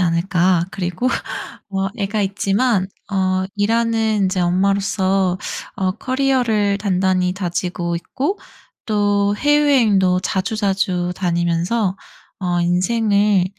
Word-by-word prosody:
않을까.' 175 0 +2
그리고 185 +5 -2 0.6
뭐 195 -1 -2
애가 205 +1 -1
있지만 195 +1 +1 0.3
어 185 -1 +1
일하는 225 +1 +1
인제 185 0 0
엄마로서 190 0 +1 0.4
어 190 -1 0
커리어를 245 -5 +1
단단히 185 -2 +1
다지고 175 -2 -2
있고 280 - -3 0.5
또 205 -1 +1
해외여행도 240 -11 +3
자주자주 190 -3 -1
다니면서 175 +3 0 0.4
어 175 -2 0
'인생을 200 +2 +2
195 Hz, 235 characters per minute, -19 LUFS, 180-215 Hz, 0.6 s, 해외여행도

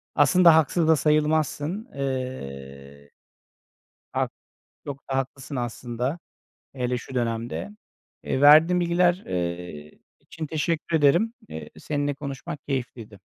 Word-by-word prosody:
Aslında 180 -3 +6
haksız 160 +1 +2
da 160 - +6
sayılmazsın. 155 - +1
Eee. 70 - -6 1.0
Hak - - -1 0.5
çok 140 -1 -8
da 135 - 0
haklısın 135 +1 -4
aslında, 120 +4 -3 0.6
hele 125 -1 -1
şu 130 - -10
dönemde. 120 - -2 0.5
Eee, 130 - -1
verdiğin 155 +5 +7
bilgiler, 175 +2 +2
eee, 85 -4 -4 0.2
için 160 - -7
teşekkür 160 +2 -1
ederim. 165 +10 +3 0.2
Eee, 80 -1 -8
seninle 145 -1 -2
konuşmak 140 +1 -7
keyifliydi. 120 -6 -5
140 Hz, 110 wpm, -25 LUFS, 115-160 Hz, 1.0 s, verdiğin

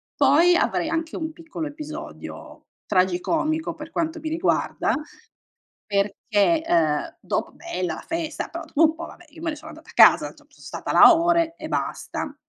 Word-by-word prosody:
Poi, 300 +6 +5
avrei 325 - 0
anche 325 0 -3
un 315 -1 -4
piccolo 325 -1 -7
episodio, 300 +1 -9 0.2
tragicomico, 210 - 0
per 305 +1 -10
quanto 325 0 -2
mi 315 - -4
riguarda, 330 +4 0 0.9
perché, 205 +8 +1
ehm, 165 - 0
dopo - - -3
bella, 185 - -4
la - - -10
festa, 330 -2 -3
però, 335 0 -7
dopo 315 -2 -4
un 320 -1 +5
po', 335 +1 -7
vabbè, 355 - -14
io 310 +2 -14
me 335 - -1
ne 305 - -6
sono 310 +2 -11
andata 315 +2 -15
a - - -16
casa, - - +6
insomma, - - -21
son - - -21
stata - - -6
là - - +9
ore, 335 0 +2
e - - -7
basta. 290 - -4
320 Hz, 175 wpm, -23 LUFS, 285-330 Hz, 0.9 s, là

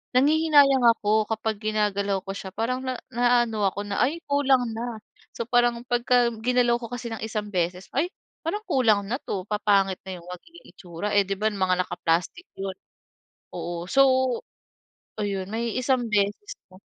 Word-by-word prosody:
nanghihinayang 285 -2 +5
ako 215 +1 +1
kapag 220 -1 -2
ginagalaw 205 -2 0
ko 195 - -4
siya. 190 - -6
Parang 250 +3 -1
na 255 -1 -2 0.2
na-aano 240 -4 +2
ako 200 - -5
na, 200 - -2
ay 295 +7 +1
kulang 265 -4 +2
na. 230 -1 -4 0.4
So 235 - -2
parang 240 -1 +2
pagka 245 0 +2
ginalaw 245 0 +3
ko 230 - -5
kasi 245 -1 -5
ng - - -6
isang 215 -2 -4
beses 180 +1 -1
ay 310 +6 +2 0.4
parang 415 +7 -3
kulang 230 - +3
na 245 +4 -1
'to, 185 -2 -4
papangit 200 -2 +2
na 185 - -4
'yong 170 - -16
magiging 335 - -12
itsura. 175 +3 -6
Eh, 200 - +5
'di 195 - -1
ba 215 +1 +2
mga 185 -2 +1
naka-plastic 175 - -1
'yon, 195 -1 -4 0.8
oo. 175 0 -5
So 275 - +6 1.2
ayun 200 -2 -2
may 230 0 -2
isang 255 -1 +1
beses 205 - 0 0.2
na. 185 - -15
220 Hz, 165 wpm, -25 LUFS, 200-250 Hz, 1.2 s, So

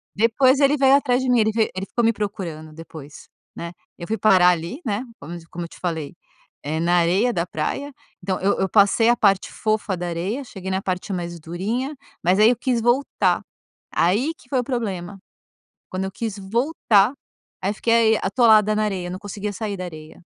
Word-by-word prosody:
Depois 255 +5 +3
ele 280 +1 +4
veio 270 0 +5
atrás 260 -3 +2
de 260 - -1
mim, 245 -2 +4
ele 220 0 +3
ve 220 0 +1
ele 190 +1 -3
ficou 240 +3 -2
me 230 - +4
procurando 170 -7 -5
depois, 155 -2 -11 0.3
né. 170 0 -6 0.3
Eu 170 - -8
fui 220 +1 -1
parar 185 -4 +5
ali, 175 - -2
né, 215 +1 -1 0.2
como 170 +4 -8
te 165 - -13
como 175 0 -6
eu - - -10
te - - -15
falei, 165 -3 -4 0.5
eh, 155 +2 -2
na 175 +1 +2
areia 190 +9 +2
da 170 -3 -1
praia. 275 - -3 0.3
Então 190 -1 -2
eu 195 +2 +1
eu 190 - +1
passei 205 +3 +4
a 240 - +5
parte 195 -4 +2
fofa 215 -3 -1
da 175 0 -4
areia, 185 +11 -3
cheguei 190 -5 -8
na 190 0 -1
parte 185 +1 -3
mais 170 -1 -5
durinha, 215 - -3 0.3
mas 180 +3 +2
aí 215 +2 +7
eu 245 - +1
quis 245 -2 0
voltar, 240 +4 +1 0.5
aí 215 - +2
que 245 - -22
foi 260 -1 +1
o - - 0
problema. 205 -7 -4 0.7
Quando 185 +1 -3
eu 190 - -4
quis 215 0 -4
voltar, 225 +1 +2 0.5
aí 195 +3 0
fiquei 230 0 +3
atolada 215 0 +4
na 215 - +1
areia, 185 -4 -2
não 185 - -6
conseguia 205 0 -5
sair 205 -1 -4
da 185 - -5
areia. 155 -1 -11
200 Hz, 200 wpm, -22 LUFS, 175-230 Hz, 0.7 s, aí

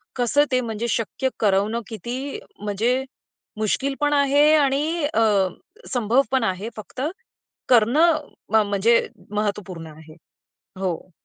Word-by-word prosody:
कसं 255 +4 +3
ते 255 0 +2
म्हणजे 230 0 -3
शक्य 230 +4 -1
करवणं 210 +2 +1
किती 245 +6 -5 0.2
म्हणजे 220 +6 0 0.5
मुश्किल 265 +6 0
पण 295 0 +2
आहे 285 +1 +4
आणि 300 +3 +1
अ, - - +2 0.7
संभव 240 +1 +3
पण 265 -2 +2
आहे, 195 +1 -2
फक्त 215 +4 -8 0.7
करणं 270 +8 +5 0.4
म 220 - +6
म्हणजे 210 +4 +3 0.2
महत्त्वपूर्ण 200 -5 -3
आहे. 155 0 -14 0.7
हो. 185 -1 -3
230 Hz, 115 wpm, -23 LUFS, 205-270 Hz, 0.7 s, म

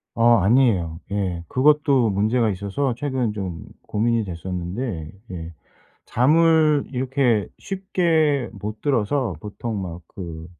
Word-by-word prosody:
어 120 0 +5
아니에요. 95 -6 +2
예. 95 -4 -1
그것도 140 - +3
문제가 110 +4 +1
있어서 100 +7 -1
최근 130 -4 -1
좀 95 -6 -5 0.2
고민이 115 +1 +1
됐었는데 90 +1 -4 0.2
예 85 -2 -7 0.5
잠을 155 +2 +4
이렇게 125 -4 +1 0.2
쉽게 165 - +1
못 105 +2 -6
들어서 130 - 0
보통 105 0 -5
막 85 -1 -6
그 85 -4 -8
115 Hz, 230 characters per minute, -22 LUFS, 95-135 Hz, 0.5 s, 어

